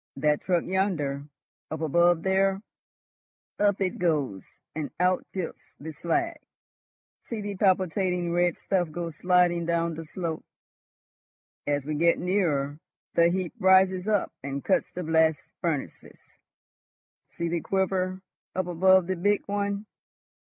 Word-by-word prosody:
That 150 +1 +1
truck 175 -3 +1
yonder, 165 -8 -1 0.4
up 155 0 -5
above 170 +2 +3
there! 195 +1 +2 1.0
Up 205 -1 +3
it 185 -1 -1
goes, 145 - 0 0.3
and 155 -2 -3
out 180 0 +2
tilts 185 -4 -6
the 155 +2 -7
slag. 335 - -1 0.9
See 230 - -4
the 205 -1 -4
palpitating 185 -2 +1
red 175 -1 +2
stuff 180 -4 0
go 170 +1 -4
sliding 175 +1 +2
down 170 0 +1
the 165 +1 -6
slope. 165 0 -4 1.2
As 145 -1 0
we 155 - -2
get 170 +3 +3
nearer, 155 -7 0 0.3
the 170 0 +5
heap 180 -1 -2
rises 190 0 +4
up 210 -3 +1
and 140 0 -4
cuts 190 - +1
the 180 - -5
blast 160 -2 +3 0.2
furnaces. 160 -5 -3 1.2
See 170 - -2
the 170 0 -1
quiver 190 0 -1 0.3
up 185 0 0
above 185 +1 +4
the 185 +1 -1
big 205 +4 +1
one. 200 0 -2
175 Hz, 130 wpm, -27 LUFS, 160-190 Hz, 1.2 s, the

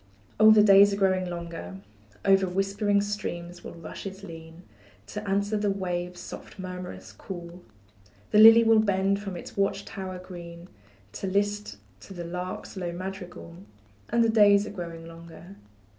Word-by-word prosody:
Oh, 215 0 +8
the 215 -1 +7
days 200 0 +7
are - - 0
growing 185 -2 +1
longer; 170 - -7 0.5
Over 195 -1 +4
whispering 200 +2 +1
streams 175 -4 -5
will - - -9
rushes 190 +4 -8
lean, 165 -1 -11 0.4
To 210 - -6
answer 200 +2 0
the 205 0 0
waves' 180 -2 -3
soft - - -10
murmurous 185 -1 -7
call; 175 -1 -9 0.7
The 210 - +5
lily 225 +1 +9
will 225 -1 +5
bend 200 -1 +1
from 195 -3 -6
its - - -10
watch 195 0 0
tower 185 -1 -6
green, 175 -1 -10 0.4
To 195 - -5
list 205 - -1 0.2
to 195 - -12
the 175 -1 -6
lark's 180 +3 -6
low 180 -3 -4
madrigal, 180 -2 -8 0.5
And 235 0 +3
the 230 - +2
days 205 -2 +5
are - - -7
growing 170 -4 -7
longer. 165 +2 -12
190 Hz, 155 wpm, -27 LUFS, 175-200 Hz, 0.7 s, lily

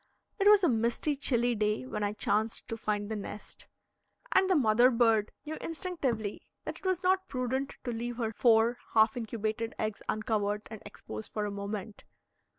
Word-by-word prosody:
It 395 - +3
was 415 -1 +7
a - - +6
misty, 235 +5 +1
chilly 245 -3 +2
day 210 +2 0
when 210 -5 -3
I 205 0 0
chanced 215 +1 0
to 225 - -2
find 210 -2 -2
the 220 - -3
nest, 210 0 -8 0.6
and 380 - +4
the 375 - +4
mother 240 -3 +5
bird 225 -3 +3 0.2
knew 315 +1 -5
instinctively 300 - -2 0.2
that - - -5
it - - -19
was 370 0 0
not 375 +1 +2
prudent 260 +1 -2
to 245 - -2
leave 235 +1 -4
her 225 -3 -1
four 230 +1 +4 0.2
half 220 0 +5
incubated 225 -1 -3
eggs 215 -1 -3
uncovered 210 -1 -1
and 220 - -8
exposed 110 - -8
for 210 -1 -2
a 205 - -3
moment. 200 +1 -6
225 Hz, 175 wpm, -30 LUFS, 215-260 Hz, 0.6 s, was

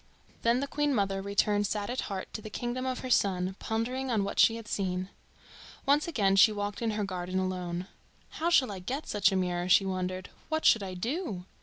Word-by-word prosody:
Then 235 +2 +2
the 280 - -2
Queen 295 -1 0
mother 195 -2 0
returned 205 +1 +1
sad 205 +2 -2
at 255 - -1
heart 190 -2 -5
to 215 - -5
the 215 - -8
kingdom 245 +4 -3
of 255 -1 -2
her 255 - -5
son, 185 -3 +2
pondering 250 +4 -2
on 220 -4 +1
what 200 - -3
she 225 - +6
had 230 -2 -8
seen. 185 -2 -2 0.8
Once 285 +3 +3
again 205 -12 +2
she 205 +3 +7
walked 205 0 -4
in 230 - 0
her 210 - 0
garden 185 -1 -3
alone. 180 -1 -2 0.4
"How 330 +2 -1
shall 270 -9 +4
I 195 - -6
get 265 - -4
such 205 -1 +3
a - - 0
mirror?" 180 -1 -1
she 195 +1 +6
wondered. 185 -1 -3 0.2
"What 315 0 -1
should 225 - +6
I 190 -2 -5
do?" 225 - -3
205 Hz, 210 wpm, -29 LUFS, 185-245 Hz, 0.8 s, she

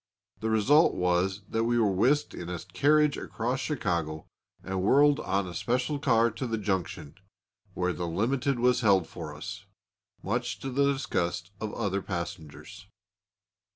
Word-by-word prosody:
The 110 - -2
result 130 +9 +4
was 90 +3 0
that 115 0 -1
we 120 +1 +2
were 110 -4 +3
whisked 130 +10 +2
in 85 - -7
a 90 - -3
carriage 145 - +2
across 125 +4 -3
Chicago 85 - -2 0.4
and 95 0 -2
whirled 145 +8 +4
on 95 -1 -1
a 90 - -7
special 125 - -1
car 115 -4 +3
to 120 +4 -4
the 115 -1 -1
junction, 95 -8 -3 0.6
where 90 0 0
the 85 +2 -4
limited 125 +9 0
was 125 +1 +3
held 100 -6 +4
for - - -8
us, - - -7 0.6
much - - -2
to 135 - -4
the 140 +2 +3
disgust 95 - -2
of 110 - -3
the - - -9
other 100 -3 -1
passengers. 85 0 -7
105 Hz, 155 wpm, -28 LUFS, 90-130 Hz, 0.6 s, result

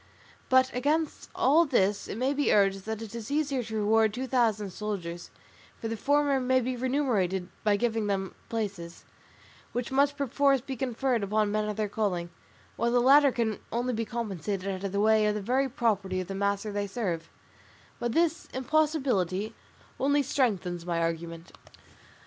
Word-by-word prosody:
But 260 0 +4
against 300 +5 -1
all 300 +6 +5
this 205 - +1
it - - -5
may 260 +4 +1
be 290 0 +1
urged 195 -1 +3
that 220 0 -4
it 220 - -9
is 230 -2 -6
easier 285 -3 0
to 220 -1 -6
reward 220 +1 +3
two 255 +1 -3
thousand 225 -6 +1
soldiers, 180 -5 -5 0.5
for 225 - -4
the 225 - -2
former 285 +3 +2
may 260 0 +2
be 255 +1 -2
remunerated 235 -9 0
by 210 -1 +3
giving 225 -2 0
them 195 -1 -2 0.2
places, 200 -7 -4 0.7
which 245 +1 -3
must 280 +1 +2
perforce 280 0 +2
be 265 +2 -6
conferred 250 -1 0
upon 210 +1 +1
men 215 0 0
of 210 - -4
their 215 -1 0
calling, 185 -5 -2 0.5
while 235 +2 +1
the 245 +1 +3
latter 275 +3 +6
can 225 -4 -1
only 245 +2 -1
be 225 - -1
recompensed 215 -4 -5
out 195 -1 -2
of 195 - -2
the 210 +1 +3
very 265 +3 +1
property 205 -7 0
of 185 - -4
the 195 - -5
master 200 +2 -1
they 205 0 -2
serve; 185 -6 -3 0.7
but 240 -1 -1
this 335 +2 +1
impossibility 260 - 0 0.5
only 285 +1 +3
strengthens 195 -11 0
my 170 -1 -1
argument. 165 0 -3
220 Hz, 165 wpm, -28 LUFS, 200-260 Hz, 0.7 s, latter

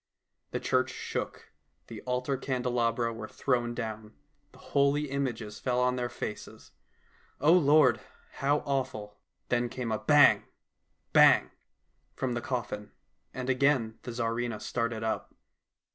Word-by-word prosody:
The - - -3
church - - +1
shook, - - -5 0.3
the 115 -3 -9
altar 125 +2 0
candelabra 120 -3 -1
were 110 -1 -7
thrown 120 -2 -1
down, 110 -2 -6 0.4
the - - -18
holy 140 +1 +1
images 120 -6 -3
fell 125 -1 0
on 125 0 +2
their 125 -1 -2
faces. - - -7 0.7
O 150 +5 +5
Lord, 155 -3 +5 0.3
how 140 +3 0
awful! 130 -7 -3 0.3
Then 120 0 +1
came 120 -2 -4
a 110 - 0
bang! 150 -2 +5 0.7
bang! - - +6 0.6
from 130 -2 -2
the 120 - -2
coffin, 115 -5 -4 0.4
and 125 -1 -5
again 130 -4 +2
the - - -8
Tsarivna 115 -1 -2
started 115 -1 -2
up. 110 - -3
125 Hz, 130 wpm, -29 LUFS, 115-135 Hz, 0.7 s, bang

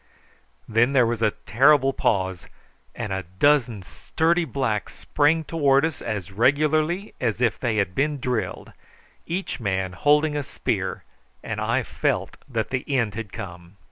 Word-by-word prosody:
Then 115 +4 +2
there 130 -3 +5
was 115 -1 -2
a 110 - +4 0.2
terrible 135 +3 +4
pause, 95 -3 -1 0.5
and 105 - -4
a 95 - -2 0.2
dozen 120 -7 +3
sturdy 165 - 0
blacks 130 -9 -2
sprang 155 +2 +1
towards 145 -3 +2
us 160 -4 -4
as 100 -4 -4
regularly 155 - +1
as 115 -3 0
if 120 -2 +1
they 120 -4 -1
had 100 -4 0
been 145 +4 0
drilled, 125 -3 -3 0.5
each 180 -1 -3
man 95 -4 -2
holding 150 +5 +3
a 145 - 0
spear, 140 - -3 0.4
and - - -4
I - - +1
felt - - -2
that 115 -4 -2
the 130 -1 -1
end 115 -5 0
had 110 -2 -6
come. 85 0 -9
125 Hz, 150 wpm, -24 LUFS, 105-150 Hz, 0.5 s, there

